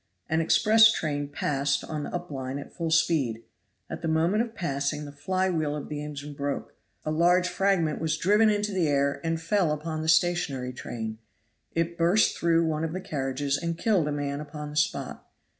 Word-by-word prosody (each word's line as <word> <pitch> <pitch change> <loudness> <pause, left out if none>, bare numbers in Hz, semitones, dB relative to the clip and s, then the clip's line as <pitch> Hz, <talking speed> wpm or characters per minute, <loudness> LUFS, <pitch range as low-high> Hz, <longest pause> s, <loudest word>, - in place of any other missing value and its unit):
An 160 +1 +1
express 220 +6 +6
train 145 -6 -2
passed 140 0 -1
on 155 -1 -4
the - - -5
up 175 -2 -5
line 135 -1 -4
at 140 - -9
full 165 -1 -3
speed. 145 -8 +1 0.4
At - - -6
the 165 - -2
moment 165 +7 +2
of 235 -1 -4
passing 145 -2 -2
the 145 - -8
fly 185 +6 -1
wheel 155 -3 -1
of 150 - -6
the 150 0 -4
engine 145 0 -7
broke; 140 0 -4 0.3
a 155 - -1
large 175 +3 +3
fragment 180 -4 +1
was 160 -1 0
driven 210 +4 +4
into 210 0 0
the 185 -5 +1
air 140 -1 +1
and 165 0 -1
fell 170 0 +1
upon 155 +1 -3
the 160 - -4
stationary 160 -6 +2
train. 110 -3 -6 0.5
It 170 +1 -1
burst 175 +6 +4
through 170 0 +2
one 155 -1 -1
of 165 0 -2
the 185 - -3
carriages 140 -2 -2
and 170 -1 -3
killed 190 -6 +2
a - - -1
man 145 0 -2
upon 150 0 -7
the - - -9
spot. 150 - -1
155 Hz, 195 wpm, -27 LUFS, 145-175 Hz, 0.5 s, express